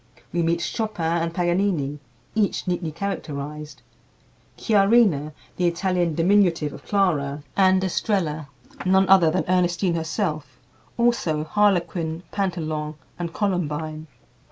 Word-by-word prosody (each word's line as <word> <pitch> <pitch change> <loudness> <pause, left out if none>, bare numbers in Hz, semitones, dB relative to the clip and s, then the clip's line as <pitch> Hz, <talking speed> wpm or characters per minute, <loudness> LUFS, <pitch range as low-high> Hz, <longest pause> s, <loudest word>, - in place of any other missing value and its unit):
We 175 - +1
meet 170 +1 +1
Chopin 170 -4 -1
and 165 0 -1
Paganini, 175 -5 0 0.3
each 215 -4 0
neatly 175 -3 -1
characterized; 150 -4 -5 0.7
Chiarina 200 -8 +3 0.3
(the 180 - +2
Italian 175 -1 0
diminutive 170 -4 +3
of - - -11
Clara) 150 -8 0
and 190 -1 +4
Estrella 170 -6 -1 0.4
(none 190 +1 +3
other 185 -4 +6
than - - 0
Ernestine 180 0 +1
herself); 160 -3 -3 0.4
also 235 -11 +1
Harlequin, 170 -3 0
Pantalon, 160 -6 -2 0.2
and 170 -1 -3
Columbine. 160 -5 -2
170 Hz, 105 wpm, -23 LUFS, 155-190 Hz, 0.7 s, other